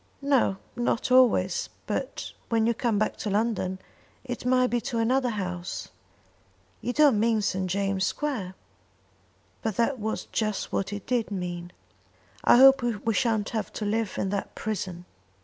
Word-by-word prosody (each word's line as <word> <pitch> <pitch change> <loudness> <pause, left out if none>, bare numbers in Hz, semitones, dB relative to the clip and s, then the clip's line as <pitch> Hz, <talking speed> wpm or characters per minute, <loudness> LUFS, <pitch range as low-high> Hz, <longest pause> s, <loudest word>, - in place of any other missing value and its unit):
"No, 270 -8 +2 0.2
not 240 0 -1
always; 235 -8 +4 0.2
but - - -4 0.2
when 225 -1 +2
you 235 - +3
come 230 -2 0
back 215 - 0
to 210 - -3
London 200 -3 0 0.5
it 245 -1 -5
may 255 0 +4
be 240 -1 0
to 235 - -3
another 250 +3 +2
house." 180 -5 -4 0.9
"You 245 - -1
don't 285 -5 +4
mean 220 -1 +2
St. 190 -1 0
James' 195 0 0
Square?" 225 -12 -3 1.1
But 220 -3 -2
that 235 +4 +1
was 220 +1 -3
just 215 -3 -2
what 195 - 0
he 205 - -3
did 245 -3 0
mean. 175 -3 -4 0.7
"I - - +6
hope 270 +1 +8
we 230 -2 -1
shan't 220 -3 +1
have 220 -2 -3
to 215 - -4
live 215 0 -1
in 195 - -1
that 200 0 -3
prison." 185 -5 -4
220 Hz, 155 wpm, -27 LUFS, 195-245 Hz, 1.1 s, hope